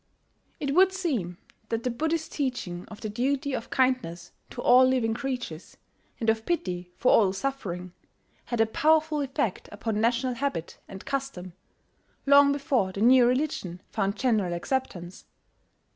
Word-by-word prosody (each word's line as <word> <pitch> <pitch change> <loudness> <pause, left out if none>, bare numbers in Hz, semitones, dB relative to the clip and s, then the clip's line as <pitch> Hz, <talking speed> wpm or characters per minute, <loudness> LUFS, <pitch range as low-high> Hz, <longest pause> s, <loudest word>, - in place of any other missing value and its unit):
It 280 -2 -2
would 380 +3 +5
seem 260 - -2 0.3
that 225 0 -2
the 250 - 0
Buddhist 320 +6 -2
teaching 240 - -3
of 215 - -11
the - - -3
duty 265 +6 -1
of 230 - -4
kindness 250 -11 0 0.2
to - - -10
all 250 +1 +6
living 255 -3 +2
creatures, 245 - -5 0.4
and 230 - -3
of 220 0 +2
pity 180 - -3
for 250 - +3
all 195 -4 +4
suffering, 190 -7 -4 0.5
had 240 - -3
a 225 - +5
powerful 310 +5 +2
effect 260 -7 -2
upon 215 +1 -2
national 245 +2 +1
habit 240 - -4
and 195 0 -10
custom, 265 -11 -4 0.7
long 280 0 +6
before 270 -8 0
the 195 - -6
new 245 +1 +6
religion 250 - -1
found 200 -2 -1
general 215 -9 +1
acceptance. 180 -4 -4
240 Hz, 145 wpm, -27 LUFS, 195-275 Hz, 0.7 s, all